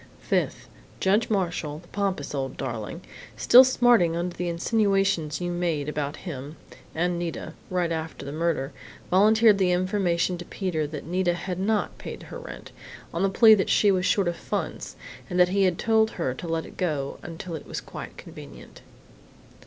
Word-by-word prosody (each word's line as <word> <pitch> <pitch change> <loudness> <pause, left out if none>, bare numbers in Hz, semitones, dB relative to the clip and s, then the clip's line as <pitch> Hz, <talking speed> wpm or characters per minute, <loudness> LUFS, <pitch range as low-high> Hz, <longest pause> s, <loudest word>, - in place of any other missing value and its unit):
"Fifth: - - -1 0.3
Judge 205 +4 +2
Marshall 175 -7 -1
the 170 +2 -15
pompous 195 -9 -2
old 135 -2 -3
darling 115 -6 -5 0.4
still 250 +2 +8
smarting 240 -9 +4
under 175 +1 -3
the 175 0 -2
insinuations 195 -4 +1
you 175 0 -2
made 170 -5 -1
about 150 -1 -3
him 145 -2 -6 0.4
and 175 +1 0
Nita 170 -2 -5 0.2
right 180 -2 0
after 160 -2 -4
the 140 - -5
murder, 155 -3 -1 0.4
volunteered 215 +2 +5
the 185 -2 +3
information 180 -1 0
to 175 - -7
Peter 170 -7 -2
that 145 -2 -7
Nita 175 +1 0
had 180 +1 -4
not 210 +2 -1
paid - - -8
her - - -8
rent, - - -10 0.4
on 170 - -2
the 195 - +3
plea 220 +3 +7
that 195 -3 +2
she 205 - +4
was 185 -1 +1
short 200 -3 +2
of 175 - -1
funds, - - -4 0.3
and 180 -1 -1
that 180 0 +6
he 195 +1 +2
had 180 -2 +1
told 220 -1 +3
her 150 -8 -1
to 170 - -8
let 165 0 -2
it - - -13
go 150 -6 -2
until 170 +1 -7
it 160 - -7
was - - -4
quite - - -9
convenient. - - -12
175 Hz, 175 wpm, -26 LUFS, 160-195 Hz, 0.4 s, still